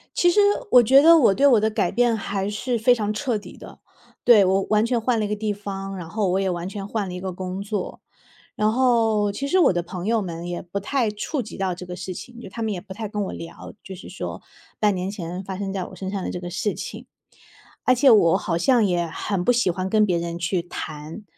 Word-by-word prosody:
其 350 0 +4
实 415 - +3 0.3
我 250 - +8
觉 265 +5 +6
得 330 +1 +8
我 230 -9 +5
对 280 - +2
我 245 -6 +6
的 220 +1 +1
改 195 -4 0
变 240 -1 +2
还 200 -1 -3
是 235 +3 -2
非 245 +2 +4
常 210 -2 -2
彻 235 0 -1
底 205 - -11
的， - - -12 0.4
对， 220 -5 +7
我 190 +1 +2
完 215 +1 +3
全 240 -1 +1
换 235 -1 +1
了 215 - 0
一 - - -2
个 210 - -2
地 210 0 -2
方， 195 -1 -6
然 170 -2 -7
后 205 -1 -1
我 190 - +1
也 195 -1 0
完 175 +1 -3
全 200 -1 -6
换 210 -3 -2
了 - - -6
一 180 - -5
个 185 -1 -5
工 185 +1 -5
作。 200 -2 -4 0.5
然 215 0 +2
后 225 -4 +2
其 275 +7 -4
实 370 +5 +3
我 320 - +5
的 175 - -1
朋 180 +1 -7
友 225 +1 +1
们 170 -2 -6
也 175 0 -4
不 180 +3 -5
太 235 +1 0
触 250 +7 -3
及 220 - -9
到 190 -2 -1
这 180 - -9
个 180 0 -7
事 185 0 -5
情， 240 +5 -10
就 235 - -9
他 230 - -7
们 220 - -1
也 185 - -3
不 190 +1 -10
太 215 +1 -5
跟 210 -1 -3
我 - - -5
聊， 165 0 -9
就 190 - -8
是 180 - -11
说 - - -6 0.4
半 210 -2 +2
年 185 +2 -3
前 180 -2 -6
发 190 0 -6
生 195 -1 -4
在 190 - -2
我 - - -10
身 190 -1 -5
上 195 -2 -3
的 - - -3
这 - - -5
个 175 0 -6
事 195 +4 -2
情， - - -7 0.8
而 255 - +4
且 260 +2 +4
我 190 -5 +6
好 170 -4 -2
像 230 +4 +3
也 175 -2 0
很 180 +3 -3
不 245 - +4
喜 240 -6 +2
欢 185 +2 -2
跟 215 +1 +4
别 180 -4 +1
人 170 0 -4
去 175 +1 0
谈， 155 +2 -7
200 Hz, 280 characters per minute, -23 LUFS, 180-225 Hz, 0.8 s, 我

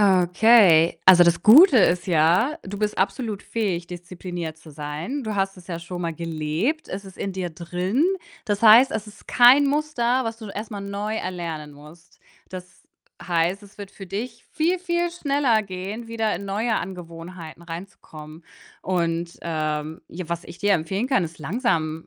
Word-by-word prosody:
Okay. 185 -2 +5
Also 180 -2 +8
das 170 -1 +2
Gute 280 - +8
ist 180 -2 +2
ja, 180 - +2
du 200 +1 -7
bist 210 0 -1
absolut 210 +1 -2
fähig, 185 -7 -3
diszipliniert 175 -2 -7
zu 160 0 -15
sein. 150 - -5
Du 215 -1 -3
hast 195 0 -1
es 180 -1 -15
ja 170 -2 -5
schon 175 +1 -7
mal 165 -1 -3
gelebt, 165 - -2
es 195 +1 -6
ist 190 -1 -13
in 195 - -3
dir 185 -2 -4
drin. 180 - -1 0.4
Das 205 -3 -2
heißt, 230 +4 +7
es 220 -1 -4
ist 210 - -16
kein 250 +4 +6
Muster, 275 -4 0
was 225 0 -4
du 220 -2 -9
erst 210 +4 -7
mal 205 -2 -6
neu 200 +2 -4
erlernen 170 -6 -5
musst. 150 +3 -17 0.3
Das 185 0 -11 0.4
heißt, 175 +2 0
es 200 - -18
wird 200 -1 -9
für 195 - -11
dich 215 +6 -6
viel, 335 +4 +1
viel 345 -1 -1
schneller 280 -9 +1
gehen, 195 +5 -6
wieder 225 -1 -1
in 200 - -8
neue 215 +3 -1
Angewohnheiten 170 -2 -8
rein 170 +3 -7
zu 180 - -29
kommen 155 +1 -12 0.4
und, 170 -2 -2
ähm, 155 -1 -3
ja, 175 -1 -8
was 170 0 -4
ich 170 +1 -12
dir 205 0 +2
empfehlen 190 +8 -2
kann, 260 -9 +2
ist 165 0 -9
langsam 160 - -2
185 Hz, 175 wpm, -23 LUFS, 170-220 Hz, 0.4 s, Also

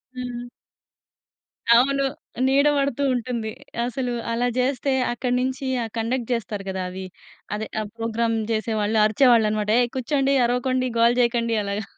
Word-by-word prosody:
హ్మ్. 245 -1 -5 1.3
అవును 275 +3 +3 0.4
నీడ 280 +2 +4
బడుతూ 280 -1 0
ఉంటుంది. 240 -2 -2 0.4
అసలు 245 0 -2 0.2
అలా 240 +2 +1
చేస్తే, 265 +1 0 0.2
అక్కడి 245 +1 -2
నించి 260 +1 -2 0.2
ఆ - - -2
కండక్ట్ 235 +2 -2
చేస్తారు 210 -3 -3
కదా 190 -1 -3
అవి. 190 +1 -7 0.5
అదే. 220 +1 -4
ఆ - - -2
ప్రోగ్రామ్ 230 0 0
చేసేవాళ్ళు 220 -1 0
అరిచేవాళ్ళనమాట, 215 -2 +3
"ఏయ్! 245 -1 +2
కుచ్చోండి. 275 +1 +1
అరవకండి. 255 +1 0
గోల 235 +1 +6
చేయకండి" 235 -1 +1
అలాగా. 200 +1 -3
240 Hz, 130 wpm, -23 LUFS, 220-255 Hz, 1.3 s, గోల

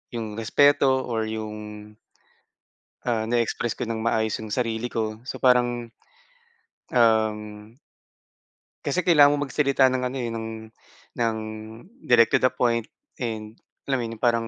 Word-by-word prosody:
yung 110 -2 -4
respeto 135 +2 +3
or 115 -2 -1
yung 105 -1 -7 1.1
ah, 115 -2 +1
na 120 0 +2
express 115 0 -1
ko - - -4
ng 110 -1 -3
maayos 110 -1 +1
yung 105 - -8
sarili 115 0 -2
ko. 110 0 -3
So, 130 - -6
parang, 120 -2 +2 1.1
um 110 -3 +3 1.4
Kasi 155 +5 0
kailangan 145 -4 +6
mo 145 - -1
magsalita 135 -2 +2
ng 130 -1 -1
ano, 130 +2 -5
eh, 120 -2 -2
ng, 115 -1 -4 0.7
ng 115 -1 +1 0.7
direct 115 -2 +5
to - - +4
the 130 - +4
point 115 -2 0 0.3
and 110 -2 -5 0.2
alam 135 -1 0
mo - - -2
yun 115 -1 -8
parang 115 -2 +2
115 Hz, 140 wpm, -24 LUFS, 110-130 Hz, 1.4 s, kailangan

